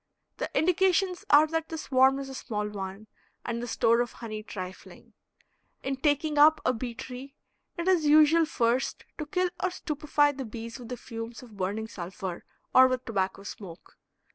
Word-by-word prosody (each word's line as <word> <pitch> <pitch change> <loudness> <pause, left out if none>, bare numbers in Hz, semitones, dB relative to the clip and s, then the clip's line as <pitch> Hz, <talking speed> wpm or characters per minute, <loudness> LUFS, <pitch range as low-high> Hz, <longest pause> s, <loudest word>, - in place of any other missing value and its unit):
The - - -3
indications 365 +2 +2
are 295 +2 +7
that 325 0 -2
the 320 - -4
swarm 265 -2 +3
is 275 -1 -5
a 270 - -8
small 210 -5 -3
one, 200 0 -6 0.4
and 235 0 -2
the 240 - -4
store 230 +1 +3
of 240 - -3
honey 215 -2 -6
trifling. 185 -3 -9 0.7
In 270 0 -1
"taking 295 +2 +1
up" 310 +2 +7
a 255 - +3
bee 240 0 -5
tree 255 +3 -8 0.4
it 340 +1 -3
is 350 -5 +3
usual 310 +2 +6
first 245 -3 0
to 305 - -4
kill 360 +3 0
or 370 - +2
stupefy 300 -4 +1
the 275 -1 -6
bees 230 +2 -7
with 240 -2 -10
the 250 - -4
fumes 230 +1 -7
of 230 -4 -14
burning 205 +4 -2
sulfur 185 -3 -6 0.3
or 260 0 +8
with 255 0 -2
tobacco 195 -3 -2
smoke. 185 -4 -10
255 Hz, 175 wpm, -28 LUFS, 220-300 Hz, 0.7 s, or